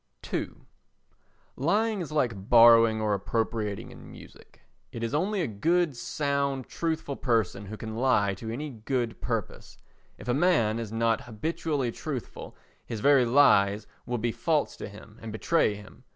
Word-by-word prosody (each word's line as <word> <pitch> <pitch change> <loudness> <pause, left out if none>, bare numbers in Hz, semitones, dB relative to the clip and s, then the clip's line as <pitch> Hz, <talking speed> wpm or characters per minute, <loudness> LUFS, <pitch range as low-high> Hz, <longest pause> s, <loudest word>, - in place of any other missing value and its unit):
ii - - -1 1.1
Lying 205 - +1
is 160 - -6
like 115 -9 -1
borrowing 115 -1 +7
or 105 -1 0
appropriating 105 0 -2
in - - -13
music. - - -15 0.3
It 115 - -6
is 115 - -2
only 190 +6 0
a 160 - 0
good, 165 - +1
sound, 140 0 -1
truthful 160 -4 -3
person 110 -6 -1
who 110 +2 -7
can 110 0 -6
lie 115 -5 +2
to 110 +4 -7
any 145 +6 -4
good 120 0 -3
purpose; - - -4 0.4
if - - -12
a 120 - +2
man 125 -8 +2
is 115 -2 -5
not 115 0 0
habitually 140 +2 -2
truthful 135 -1 -7 0.3
his 115 - -6
very 140 +1 +5
lies 110 -6 +4 0.2
will 120 0 -1
be 115 +1 -1
false 155 +4 0
to - - -7
him 105 +2 -14
and 115 - -7
betray 110 0 +1
him. 105 +4 -14
120 Hz, 155 wpm, -27 LUFS, 110-145 Hz, 1.1 s, borrowing